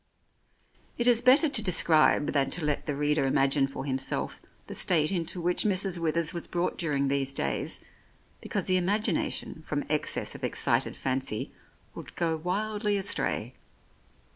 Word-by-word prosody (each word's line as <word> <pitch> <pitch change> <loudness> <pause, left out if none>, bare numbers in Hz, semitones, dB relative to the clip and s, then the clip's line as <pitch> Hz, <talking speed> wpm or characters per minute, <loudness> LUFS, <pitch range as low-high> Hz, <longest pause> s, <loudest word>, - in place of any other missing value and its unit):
It 240 - +1
is 240 -1 +5
better 260 +6 +6
to 265 -6 0
describe 160 -6 +4
than 135 -2 +1
to 165 +2 -2
let 150 -1 -1
the 145 - -1
reader 145 -1 +1
imagine 135 +1 +2
for 135 0 -6
himself 135 -1 -3 0.3
the - - -8
state 155 -2 +2
into 175 -1 -2
which 175 +1 +1
Mrs. 190 -3 0
Withers 165 +1 0
was 170 - -5
brought 175 0 -1
during 145 -5 0
these 135 0 -1
days, 70 - -2 0.6
because - - -3
the 185 0 +3
imagina 205 +1 +1
tion 160 - -6
from 150 -2 -3
excess 150 - 0
of - - -11
excited - - 0
fancy 130 -4 -2 0.4
would - - -10
go 165 -2 0
wildly 205 +5 -1
astray. 195 0 -2
165 Hz, 155 wpm, -28 LUFS, 140-190 Hz, 0.6 s, better